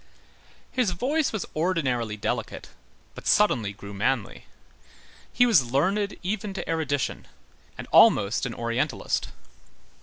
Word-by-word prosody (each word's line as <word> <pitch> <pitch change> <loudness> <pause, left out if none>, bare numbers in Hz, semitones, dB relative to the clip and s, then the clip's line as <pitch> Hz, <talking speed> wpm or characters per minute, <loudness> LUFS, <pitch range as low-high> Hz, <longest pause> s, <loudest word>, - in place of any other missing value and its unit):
His 250 -6 +1
voice 275 - 0
was 220 - -3
ordinarily 130 -10 -1
delicate, - - -4 0.4
but - - -9
suddenly 120 - +3
grew 100 0 -10
manly. 110 +2 -2 0.9
He 245 - +4
was 155 - +4
learned 195 +9 0
even 195 +1 -3
to - - -5
erudition, 150 -4 -2 0.5
and - - -7
almost 100 +5 +5
an 115 - -6
Orientalist. 115 +1 -1
155 Hz, 115 wpm, -26 LUFS, -, 0.9 s, almost